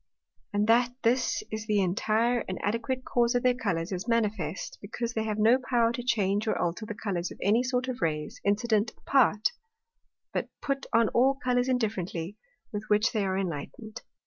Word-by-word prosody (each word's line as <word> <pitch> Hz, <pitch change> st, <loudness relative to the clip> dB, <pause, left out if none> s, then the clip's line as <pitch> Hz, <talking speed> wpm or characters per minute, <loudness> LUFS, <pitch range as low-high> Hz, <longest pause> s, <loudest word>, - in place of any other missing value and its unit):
And 205 Hz, 0 st, +1 dB
that 240 Hz, +2 st, +3 dB
this 250 Hz, +2 st, +2 dB
is 215 Hz, 0 st, -4 dB
the 210 Hz, -2 st, +2 dB
intire 220 Hz, +6 st, +1 dB
and 185 Hz, -, -3 dB
adequate 230 Hz, +5 st, -1 dB
cause 240 Hz, 0 st, +2 dB
of 245 Hz, -, +1 dB
their 250 Hz, 0 st, +4 dB
Colours, 195 Hz, -8 st, -2 dB
is 185 Hz, +4 st, -4 dB
manifest, 210 Hz, -8 st, -1 dB
because 230 Hz, +3 st, -4 dB
they 220 Hz, -1 st, -1 dB
have 215 Hz, -1 st, -2 dB
no 225 Hz, +4 st, +5 dB
power 240 Hz, -3 st, +2 dB
to 240 Hz, -, -4 dB
change 210 Hz, -4 st, +1 dB
or -, -, +1 dB
alter 175 Hz, +6 st, -2 dB
the 210 Hz, -, -5 dB
Colours 185 Hz, -5 st, -2 dB
of -, -, -10 dB
any 215 Hz, +5 st, +3 dB
sort 250 Hz, 0 st, -1 dB
of 255 Hz, -1 st, -4 dB
Rays 150 Hz, -2 st, -2 dB
incident 215 Hz, +1 st, +1 dB
apart, 225 Hz, -6 st, +3 dB, 0.8 s
but -, -, -2 dB
put 275 Hz, -1 st, -2 dB
on 230 Hz, -1 st, +4 dB
all 265 Hz, +3 st, +3 dB
Colours 250 Hz, 0 st, +2 dB
indifferently, 200 Hz, -7 st, -2 dB, 0.4 s
with 210 Hz, +1 st, -4 dB
which 210 Hz, +3 st, +3 dB
they 215 Hz, -4 st, 0 dB
are 190 Hz, -1 st, 0 dB
enlightned. 195 Hz, +5 st, -5 dB
220 Hz, 180 wpm, -28 LUFS, 200-245 Hz, 0.8 s, no